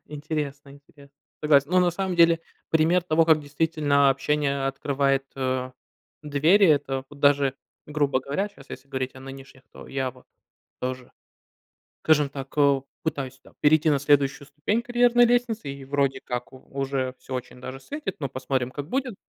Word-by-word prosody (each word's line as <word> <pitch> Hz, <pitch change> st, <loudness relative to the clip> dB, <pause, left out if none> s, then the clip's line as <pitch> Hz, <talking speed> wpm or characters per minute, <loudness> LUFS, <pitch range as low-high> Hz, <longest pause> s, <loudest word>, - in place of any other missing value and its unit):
Интересно 145 Hz, -2 st, -5 dB
интересно, 140 Hz, 0 st, -18 dB, 0.3 s
согласен. 145 Hz, -1 st, +4 dB
Ну, 185 Hz, 0 st, +4 dB
на 175 Hz, -1 st, +3 dB
самом 185 Hz, 0 st, -3 dB
деле, 165 Hz, -1 st, +5 dB, 0.3 s
пример 165 Hz, +3 st, +3 dB
того, 165 Hz, -1 st, +3 dB
как 160 Hz, -1 st, +4 dB
действительно 145 Hz, -1 st, +2 dB
общение 140 Hz, 0 st, 0 dB
открывает, 135 Hz, 0 st, 0 dB
э, 130 Hz, -1 st, -2 dB, 0.5 s
двери- 155 Hz, +8 st, +4 dB
это 135 Hz, -3 st, +1 dB
вот 145 Hz, -1 st, -14 dB
даже, 140 Hz, -2 st, +3 dB, 0.3 s
грубо 145 Hz, -3 st, 0 dB
говоря, 145 Hz, +10 st, -2 dB
щас, 140 Hz, -9 st, -18 dB
если 140 Hz, -, -9 dB
говорить 130 Hz, -1 st, -3 dB
о 130 Hz, -, -12 dB
нынешних, 135 Hz, 0 st, -11 dB
то -, -, -12 dB
я 135 Hz, -1 st, -2 dB
вот 125 Hz, 0 st, -20 dB, 0.6 s
тоже, 130 Hz, 0 st, -4 dB, 0.9 s
скажем 150 Hz, -3 st, +4 dB
так, 135 Hz, -1 st, -8 dB
эу, 140 Hz, -2 st, +3 dB, 0.2 s
пытаюсь 135 Hz, -4 st, -4 dB
там -, -, -20 dB
перейти 155 Hz, +1 st, +4 dB
на 145 Hz, -2 st, +2 dB
следующую 140 Hz, 0 st, +2 dB
ступень 150 Hz, +10 st, -1 dB
карьерной 240 Hz, 0 st, +4 dB
лестницы, 235 Hz, -8 st, 0 dB
и 135 Hz, 0 st, -7 dB
вроде 135 Hz, -1 st, 0 dB
как 125 Hz, 0 st, -5 dB
у -, -, -10 dB
уже 135 Hz, -2 st, -2 dB
всё 130 Hz, -, -9 dB
очень 125 Hz, 0 st, -7 dB
даже 130 Hz, +1 st, -7 dB
светит, 290 Hz, -, -6 dB
но 140 Hz, -3 st, -3 dB
посмотрим, 130 Hz, -1 st, -2 dB
как 145 Hz, +1 st, -6 dB
будет. 255 Hz, -2 st, -2 dB
140 Hz, 165 wpm, -25 LUFS, 135-155 Hz, 0.9 s, деле